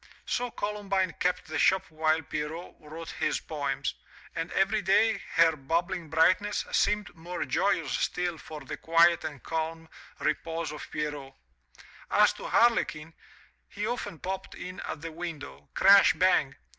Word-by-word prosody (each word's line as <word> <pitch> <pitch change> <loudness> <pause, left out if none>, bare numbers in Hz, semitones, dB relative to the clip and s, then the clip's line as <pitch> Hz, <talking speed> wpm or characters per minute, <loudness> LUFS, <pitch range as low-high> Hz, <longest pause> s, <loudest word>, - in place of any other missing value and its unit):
So 245 0 -1
Columbine 200 -4 -1
kept 180 0 0
the 155 -1 -3
shop 190 +4 +4
while 155 0 +1
Pierrot 155 +4 -5
wrote 160 +2 -8
his - - +1
poems, 140 -4 -3 0.4
and 165 0 -3
every 200 +3 +2
day 205 +3 +3
her 165 -1 +5
bubbling 165 +3 -2
brightness 185 +6 +2
seemed 210 0 +1
more 175 +2 -5
joyous 165 -9 +1
still 175 -2 -1
for 155 -1 -9
the 135 - -6
quiet 170 +1 +4
and 145 -5 -6
calm 165 0 -3 0.3
repose 165 +2 -2
of 150 - -8
Pierrot. 145 -3 -4 0.7
As - - +5
to - - -8
Harlequin, 165 -9 +2 0.6
he 205 +1 -4
often 215 -6 -3
popped 190 +5 -5
in 185 +1 -7
at 145 - -6
the 165 0 -6
window 160 -3 -7
Crash 195 +1 +7
bang! 180 -7 +2
165 Hz, 145 wpm, -28 LUFS, 155-190 Hz, 0.7 s, Crash